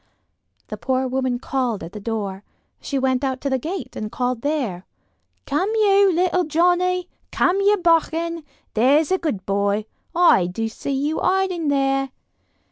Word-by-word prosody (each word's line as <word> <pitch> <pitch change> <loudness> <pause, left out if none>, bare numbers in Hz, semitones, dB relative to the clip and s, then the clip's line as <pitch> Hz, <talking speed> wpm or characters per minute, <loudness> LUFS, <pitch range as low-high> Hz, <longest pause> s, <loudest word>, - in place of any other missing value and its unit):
The - - -5
poor 260 0 0
woman 255 -1 -1
called 245 -5 -2
at 165 - -8
the 210 - -8
door. 200 -3 -4 0.4
She 280 - -3
went 260 0 +1
out 260 -1 -1
to 280 - -2
the 265 - +1
gate 345 +8 -5
and 215 0 -5
called 250 -2 -2
there: 250 - -2 0.6
"Come 300 +8 0
you, 400 -2 +4
little 360 +1 +2
Johnnie. 355 +3 +1 0.2
Come 365 +2 +2
you, 410 +1 +4
bachgen, 335 -1 +1 0.3
there's 280 +8 +3
a 375 - +2
good 215 - -3
boy. 200 +1 0 0.3
I 335 - +5
do 225 +5 -3
see 225 - -7
you 290 +4 -1
hiding 370 -4 0
there." 270 -1 +1
275 Hz, 155 wpm, -22 LUFS, 240-350 Hz, 0.6 s, I